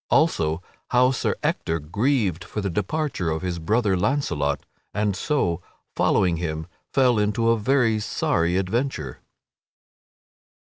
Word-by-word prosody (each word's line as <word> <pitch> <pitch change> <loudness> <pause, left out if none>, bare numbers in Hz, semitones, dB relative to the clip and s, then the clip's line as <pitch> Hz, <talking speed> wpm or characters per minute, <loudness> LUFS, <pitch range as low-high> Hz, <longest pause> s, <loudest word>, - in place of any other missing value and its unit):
Also 80 - +2 0.3
How 125 +1 +4
Sir 130 - 0
Ector 80 - 0
Grieved 100 - 0
for 100 - -5
the 100 -2 -1
Departure 105 - -1
of 80 +2 -2
His 90 -2 -2
Brother 105 +4 +2
Launcelot 90 - 0 0.3
and 105 -2 +1
So, 95 - 0 0.3
Following 90 -3 +2
Him, 80 -2 -3 0.3
Fell 125 -4 +4
into 105 +2 +1
a 115 - +3
Very 115 -1 +2
Sorry 85 -4 0
Adventure_. 95 - -1
100 Hz, 125 wpm, -24 LUFS, 85-125 Hz, 0.3 s, How